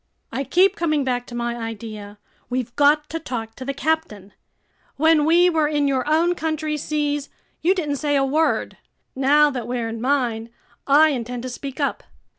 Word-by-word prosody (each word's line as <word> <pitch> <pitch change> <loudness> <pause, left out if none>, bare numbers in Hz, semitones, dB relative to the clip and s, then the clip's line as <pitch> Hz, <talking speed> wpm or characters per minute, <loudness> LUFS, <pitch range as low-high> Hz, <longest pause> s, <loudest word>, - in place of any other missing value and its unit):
"I 270 - -2
keep 375 +6 +3
coming 310 -6 0
back 245 -2 -2
to 240 - -8
my 240 0 -2
idea. 215 -3 -7 0.3
We've 245 -1 -3
got 295 +1 +4
to 325 - -3
talk 230 -7 -5
to 260 - -6
the 275 - -2
captain. 275 -10 -2 0.6
When 315 0 +4
we 345 +3 +5
were 320 -4 +2
in 295 -1 +1
your 270 +1 0
own 335 +3 +3
country's 310 -3 -2
seas, 295 -2 -2 0.3
you 365 +4 +3
didn't 300 -6 -2
say 290 0 0
a 270 -1 +3
word. 310 +4 0 0.4
Now 290 +3 +4
that 245 -4 -5
we're 240 -2 -2
in 225 0 -6
mine, 240 -4 0 0.4
I 300 +3 +6
intend 245 -3 -4
to 255 - -4
speak 270 +3 -7
up. 280 - -1
280 Hz, 180 wpm, -22 LUFS, 245-310 Hz, 0.6 s, I